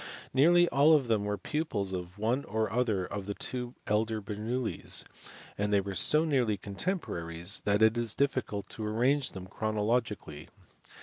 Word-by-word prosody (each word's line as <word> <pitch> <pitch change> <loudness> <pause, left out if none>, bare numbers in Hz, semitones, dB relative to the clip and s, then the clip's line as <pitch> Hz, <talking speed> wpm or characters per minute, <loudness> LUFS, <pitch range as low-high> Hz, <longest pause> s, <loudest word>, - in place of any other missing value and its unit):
Nearly 175 +6 +5
all 150 +3 +5
of 140 -5 +1
them 110 -3 +1
were 105 0 -1
pupils 105 -12 -2
of 90 +1 -6
one 115 +6 0
or 110 -1 -1
other 110 -6 0
of 100 +1 -6
the 100 - -3
two 125 -1 -4
elder 110 +1 0
Bernoullis, 110 +4 -1 0.5
and 105 0 0
they 100 - +4
were 100 0 -4
so 150 - +5
nearly 125 -9 +1
contemporaries 95 - -2
that 105 +1 +3
it 110 +1 +5
is 120 -3 -1
difficult 130 -8 -1
to 110 - -6
arrange 125 +6 +1
them 95 -1 -7
chrono 110 +2 -2
logically. 105 -10 -2
110 Hz, 165 wpm, -30 LUFS, 100-125 Hz, 0.5 s, Nearly